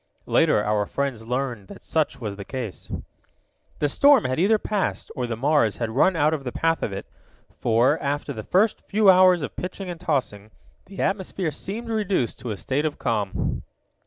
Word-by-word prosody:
Later 105 Hz, -, +3 dB
our 105 Hz, -1 st, 0 dB
friends 130 Hz, -5 st, -3 dB
learned 125 Hz, -5 st, -2 dB
that -, -, -12 dB
such 155 Hz, -4 st, 0 dB
was 105 Hz, -5 st, -4 dB
the 100 Hz, -, -7 dB
case. 120 Hz, -2 st, -6 dB, 0.9 s
The 145 Hz, -, +1 dB
storm 280 Hz, -, +5 dB
had 130 Hz, +3 st, -1 dB
either 210 Hz, +5 st, +4 dB
passed, 210 Hz, -1 st, -2 dB
or 125 Hz, -4 st, -2 dB
the 115 Hz, -, -2 dB
Mars 135 Hz, -4 st, +2 dB
had 115 Hz, -2 st, -2 dB
run 155 Hz, +10 st, +3 dB
out 155 Hz, 0 st, +3 dB
of 150 Hz, -3 st, -3 dB
the 125 Hz, -, -4 dB
path 165 Hz, +4 st, 0 dB
of -, -, -2 dB
it, 95 Hz, -, -5 dB, 0.5 s
for, 120 Hz, +7 st, +3 dB
after 145 Hz, +1 st, -2 dB
the 110 Hz, -, -5 dB
first 195 Hz, -, +2 dB
few 205 Hz, -1 st, +4 dB
hours 185 Hz, -3 st, +5 dB
of -, -, -5 dB
pitching 185 Hz, 0 st, -5 dB
and 170 Hz, -, -8 dB
tossing, 125 Hz, -, -2 dB, 0.4 s
the 195 Hz, -, -6 dB
atmosphere 190 Hz, -3 st, -1 dB
seemed 215 Hz, -, -6 dB
reduced 205 Hz, -, 0 dB
to 125 Hz, -, -6 dB
a 105 Hz, -, -3 dB
state 135 Hz, +7 st, -1 dB
of 155 Hz, -2 st, -2 dB
calm. 105 Hz, -5 st, -1 dB
145 Hz, 190 wpm, -24 LUFS, 115-185 Hz, 0.9 s, storm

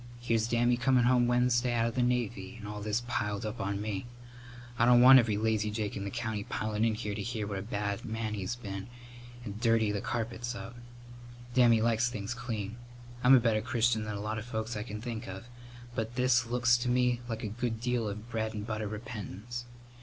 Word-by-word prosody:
Here's 115 Hz, -2 st, +1 dB
Dammy 120 Hz, +1 st, +2 dB
comin' 125 Hz, +1 st, +3 dB
home 120 Hz, 0 st, +4 dB
Wednesday 120 Hz, 0 st, +2 dB
out 115 Hz, -1 st, +2 dB
of 115 Hz, -, -1 dB
the 125 Hz, -, 0 dB
Navy, 120 Hz, -3 st, -1 dB
and 105 Hz, -2 st, -8 dB
all 105 Hz, 0 st, -6 dB
this 110 Hz, +3 st, -1 dB
piled 105 Hz, -3 st, -2 dB
up 110 Hz, 0 st, -4 dB
on 100 Hz, 0 st, -2 dB
me. 105 Hz, +1 st, -3 dB, 0.7 s
I -, -, +4 dB
don't 120 Hz, 0 st, +7 dB
want 130 Hz, +2 st, +10 dB
every 110 Hz, -4 st, +1 dB
lazyjake 105 Hz, -1 st, 0 dB
in 100 Hz, -, -4 dB
the -, -, -2 dB
country 110 Hz, -2 st, -3 dB
pilin' 110 Hz, 0 st, -1 dB
in 115 Hz, -1 st, +2 dB
here 105 Hz, -2 st, -3 dB
to 100 Hz, -, -4 dB
hear 110 Hz, 0 st, -3 dB
what 100 Hz, -1 st, -3 dB
a -, -, -4 dB
bad 100 Hz, 0 st, -3 dB
man 110 Hz, -2 st, -3 dB
he's 105 Hz, +3 st, -3 dB
been, 100 Hz, -5 st, -6 dB, 0.6 s
and 105 Hz, 0 st, -6 dB
dirty 115 Hz, -3 st, +3 dB
the 100 Hz, -1 st, -2 dB
carpets 120 Hz, +1 st, -3 dB
up. 115 Hz, 0 st, -8 dB, 0.8 s
Dammy 120 Hz, -3 st, +5 dB
likes 115 Hz, +1 st, +2 dB
things 105 Hz, -1 st, -4 dB
clean. 115 Hz, -3 st, -4 dB, 0.5 s
I'm 130 Hz, +2 st, +8 dB
a -, -, +7 dB
better 115 Hz, -2 st, +2 dB
Christian 115 Hz, -1 st, +1 dB
than 105 Hz, -1 st, -4 dB
a 100 Hz, -, -4 dB
lot 110 Hz, +1 st, -2 dB
of 105 Hz, -, -8 dB
folks 110 Hz, -1 st, -3 dB
I 105 Hz, -, -3 dB
can 105 Hz, -1 st, -6 dB
think 115 Hz, -2 st, -5 dB
of, 95 Hz, +3 st, -7 dB, 0.5 s
but 115 Hz, +1 st, -3 dB
this 125 Hz, -2 st, +3 dB
looks 120 Hz, 0 st, +3 dB
to 125 Hz, 0 st, -1 dB
me 125 Hz, -1 st, +2 dB
like 115 Hz, 0 st, -4 dB
a -, -, -1 dB
good 115 Hz, +1 st, -3 dB
deal 120 Hz, -2 st, 0 dB
of 100 Hz, -, -4 dB
a -, -, -8 dB
bread 110 Hz, -1 st, -3 dB
and 105 Hz, 0 st, -4 dB
butter 110 Hz, -2 st, -3 dB
repentance. 110 Hz, +1 st, -6 dB
115 Hz, 215 wpm, -31 LUFS, 105-120 Hz, 0.8 s, want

